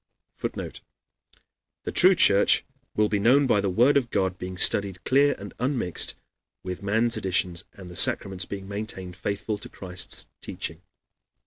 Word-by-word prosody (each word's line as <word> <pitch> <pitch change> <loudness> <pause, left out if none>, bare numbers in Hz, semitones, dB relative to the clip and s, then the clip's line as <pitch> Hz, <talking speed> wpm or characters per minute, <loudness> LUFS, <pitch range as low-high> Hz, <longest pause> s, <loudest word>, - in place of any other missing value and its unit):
[Footnote: - - -6 1.0
"The - - -4
true 185 +1 +6
Church 100 - +4 0.3
will 105 0 +2
be 105 -1 -1
known 130 +7 +4
by 105 -6 +2
the 100 - -1
Word 120 +10 +4
of 125 -4 -1
God 95 -3 -1
being 90 0 -6
studied 95 -1 +3
clear 140 +2 +3
and 100 0 -10
unmixed 125 - -1 0.5
with 90 -1 -6
man's 110 +4 +1
additions 90 -2 -2
and 95 -2 -12
the 90 - -11
sacraments 95 +2 +2
being 100 -1 -7
maintained 100 -3 -6
faithful 100 +3 -4
to - - -10
Christ's 90 -1 -3
teaching." 80 +1 -6
100 Hz, 150 wpm, -25 LUFS, 95-115 Hz, 1.0 s, true